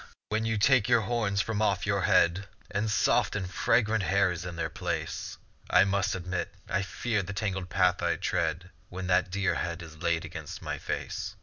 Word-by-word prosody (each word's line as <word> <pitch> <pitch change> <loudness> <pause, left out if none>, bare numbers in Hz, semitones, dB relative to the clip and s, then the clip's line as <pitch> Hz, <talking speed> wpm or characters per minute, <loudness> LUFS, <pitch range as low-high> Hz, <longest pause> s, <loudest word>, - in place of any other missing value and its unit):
when 110 +1 0
you 110 -1 0
take 120 +1 +4
your 120 -2 +5
horns 105 -3 0
from 110 -1 -2
off 100 -3 +1
your 100 0 +1
head, 90 +2 +3 0.2
And 105 +2 0
soft 105 - +2
and 100 -3 -2
fragrant 110 +3 +2
hair 100 0 +2
is 90 +1 -5
in 85 - -6
their 85 - -1
place; - - -4 0.3
I - - +6
must 100 0 +1
admit 90 0 -3 0.2
I 95 - 0
fear 105 +2 -1
the 100 +2 -6
tangled 95 -3 -2
path 90 +2 +2
I 85 0 +1
tread 85 +1 -1 0.2
When 95 +1 -5
that 90 0 +2
dear 100 +1 0
head 85 0 -3
is 80 -1 -11
laid 85 -2 0
against - - -7
my - - -4
face. - - -4
95 Hz, 195 wpm, -29 LUFS, 90-105 Hz, 0.3 s, I